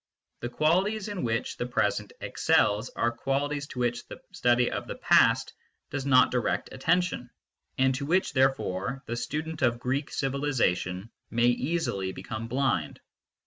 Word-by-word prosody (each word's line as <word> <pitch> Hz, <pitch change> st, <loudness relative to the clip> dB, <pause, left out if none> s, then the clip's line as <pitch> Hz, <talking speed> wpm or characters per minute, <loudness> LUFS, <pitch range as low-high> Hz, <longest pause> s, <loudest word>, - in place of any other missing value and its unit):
The 120 Hz, -, -4 dB
qualities 190 Hz, -, +1 dB
in 205 Hz, -3 st, -4 dB
which 115 Hz, -2 st, -2 dB
the 120 Hz, -, -2 dB
present 105 Hz, -3 st, 0 dB
excels 105 Hz, +4 st, +2 dB
are 115 Hz, -, +1 dB
qualities 140 Hz, +4 st, -2 dB
to 125 Hz, -, -8 dB
which 120 Hz, 0 st, -1 dB
the -, -, -9 dB
study 120 Hz, 0 st, +2 dB
of -, -, -4 dB
the -, -, -5 dB
past -, -, +4 dB, 0.4 s
does 140 Hz, -1 st, -3 dB
not 130 Hz, -2 st, +5 dB
direct 125 Hz, -2 st, -1 dB
attention, 135 Hz, -2 st, 0 dB, 0.5 s
and 130 Hz, 0 st, +3 dB
to 140 Hz, +2 st, -4 dB
which, 185 Hz, +4 st, +1 dB
therefore, 130 Hz, -2 st, 0 dB
the 120 Hz, -, -3 dB
student 155 Hz, +5 st, -4 dB
of 120 Hz, -1 st, +3 dB
Greek 130 Hz, +4 st, -2 dB
civilisation 115 Hz, -8 st, -1 dB, 0.2 s
may 120 Hz, +1 st, +2 dB
easily 120 Hz, -, -1 dB
become 115 Hz, -1 st, -6 dB
blind. 135 Hz, +3 st, 0 dB
130 Hz, 145 wpm, -28 LUFS, 120-145 Hz, 0.5 s, not